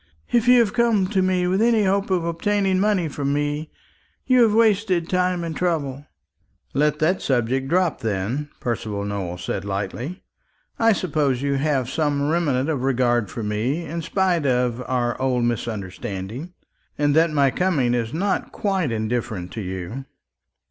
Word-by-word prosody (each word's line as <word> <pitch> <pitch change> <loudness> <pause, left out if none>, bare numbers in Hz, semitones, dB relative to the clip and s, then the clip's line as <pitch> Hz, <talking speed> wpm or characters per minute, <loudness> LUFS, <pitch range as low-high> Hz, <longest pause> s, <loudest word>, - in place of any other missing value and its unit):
If 240 -1 +2
you 250 0 +7
have 210 -3 0
come 230 -5 +3
to 195 -3 +1
me 185 -1 +1
with 185 +3 +1
any 230 -2 +4
hope 195 +1 +1
of 180 -3 +1
obtaining 190 +3 +1
money 200 -4 +2
from 140 -1 -2
me, 145 +1 -2 0.6
you 255 -1 +4
have 225 -2 +5
wasted 205 -6 +2
time 180 -1 +1
and 165 -2 -4
trouble." 145 -5 -2 0.7
"Let 150 +1 +2
that 175 +5 +1
subject 130 +1 0
drop, 175 +2 +1
then," 115 +8 -2
Percival 105 -4 -3
Nowell 95 -4 -4
said 90 +1 -4
lightly. 100 - -4 0.6
"I 225 0 +5
suppose 145 - 0
you 140 0 +1
have 135 -2 0
some 145 0 0
remnant 145 -6 +1
of 150 -5 -1
regard 120 -4 +1
for 115 - -5
me, 115 +11 -1
in 165 +2 -4
spite 175 -3 +1
of 125 -1 +1
our 120 -1 -1
old 125 -2 +1
misunderstanding, 110 - -4 0.4
and 145 0 +2
that 165 +1 +5
my 140 -3 +3
coming 150 -10 +1
is 115 -2 -1
not 190 +6 -1
quite 190 - -1
indifferent 110 -4 -2
to 110 - -5
you." 95 +7 -5
145 Hz, 160 wpm, -23 LUFS, 120-180 Hz, 0.7 s, you